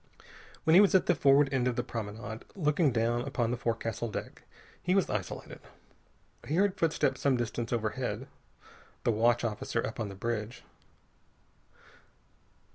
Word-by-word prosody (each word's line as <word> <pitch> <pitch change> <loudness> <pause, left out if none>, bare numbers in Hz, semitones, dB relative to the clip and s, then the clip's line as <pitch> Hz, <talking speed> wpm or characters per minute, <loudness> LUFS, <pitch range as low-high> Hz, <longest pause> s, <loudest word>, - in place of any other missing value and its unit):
When 160 - +4
he 185 - +9
was 200 -1 +4
at 190 - +5
the - - +4
forward 140 -2 +4
end 125 -2 +2
of 125 - 0
the - - -1
promenade, 110 0 -6
looking 150 -4 +2
down 115 +1 +1
upon 120 -3 -1
the - - 0
forecastle 115 0 -2
deck, - - -6 0.4
he 180 +1 +1
was 195 - +3
isolated. 100 -3 -5 0.9
He 150 - -1
heard 200 +1 +3
footsteps 155 -7 0
some 135 -3 +3
distance 120 0 -3
overhead. 110 -3 -2 0.8
The - - +3
watch 120 +2 +2
officer 115 +1 -2
up 110 - -6
on 110 -3 -2
the 100 - -8
bridge. 115 +2 -4
120 Hz, 150 wpm, -30 LUFS, 115-145 Hz, 0.9 s, he